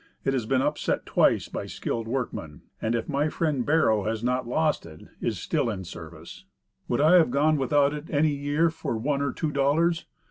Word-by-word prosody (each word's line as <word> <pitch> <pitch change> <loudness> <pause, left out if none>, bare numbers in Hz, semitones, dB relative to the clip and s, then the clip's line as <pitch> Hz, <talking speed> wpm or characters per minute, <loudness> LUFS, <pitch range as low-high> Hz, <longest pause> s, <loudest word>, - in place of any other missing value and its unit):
It 135 - +1
has 120 -5 -1
been 130 +1 +2
''upset" - - -1
twice - - +2
by - - -5
skilled 115 -1 -4
workmen; 115 - -4 0.2
and, 110 +1 0
if 115 - -2
my 145 +1 0
friend 150 -6 0
"Bero" 115 -9 +2
has 110 +1 -2
not 125 0 0
lost 155 +4 +1
it, 80 -2 -12 0.2
is - - -1
still - - -1
in 95 -4 -4
service. 85 -2 -10 0.4
Would 120 - 0
I 160 +4 +7
have 165 -7 +4
gone 150 +4 +2
without 140 +1 +2
it 150 0 -6
any 150 0 +2
year 145 +4 +1
for 155 -7 -3
one 140 +5 -1
or 140 -2 0
two 155 - -2
dollars? 155 +5 +1
140 Hz, 200 wpm, -26 LUFS, 115-150 Hz, 0.4 s, I